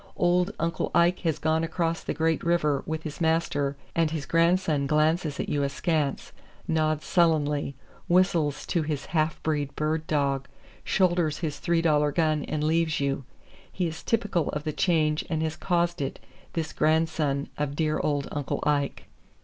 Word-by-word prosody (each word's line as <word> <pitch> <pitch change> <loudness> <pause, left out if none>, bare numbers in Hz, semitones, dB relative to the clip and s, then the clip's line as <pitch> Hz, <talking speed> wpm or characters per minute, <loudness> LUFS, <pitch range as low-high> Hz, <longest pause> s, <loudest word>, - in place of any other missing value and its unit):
Old 180 +1 +3
"Uncle 165 -1 -1
Ike" 170 +1 +4
has 160 -3 0
gone 160 +1 +1
across 165 0 -1
the - - -3
"Great 160 +1 +1
River" 150 -5 +2
with 160 0 -3
his 155 +1 -7
master, 160 -4 +1 0.2
and 165 -2 +2
his 155 -3 -4
grandson 165 -3 +2
glances 155 0 +1
at - - -2
you 145 - 0
askance, 145 +1 -1 0.4
nods 155 -2 0
sullenly, 150 -4 +2 0.3
whistles 170 -5 +2
to 170 - 0
his 150 -2 -3
half 155 -1 0
breed 145 -3 -1
bird 155 +1 -1
dog, 140 -3 0 0.4
shoulders 175 -5 +2
his 145 -2 -4
three 170 +1 +1
dollar 150 -2 +3
gun 155 -1 +1
and 150 0 -2
leaves 160 0 +1
you. 140 -1 -1 0.5
He 180 - -1
is 165 -1 -4
typical 205 -8 0
of 150 - -3
the 155 - -2
change 155 -4 +2
and 160 -1 0
has 160 0 -2
caused 175 -3 0
it, 135 - -3 0.3
this 160 -2 -3
grandson 155 -3 +1
of 145 -1 -1
dear 155 0 0
old 145 -2 0
Uncle 145 -2 -3
Ike. 145 -2 0
155 Hz, 165 wpm, -27 LUFS, 145-165 Hz, 0.5 s, Ike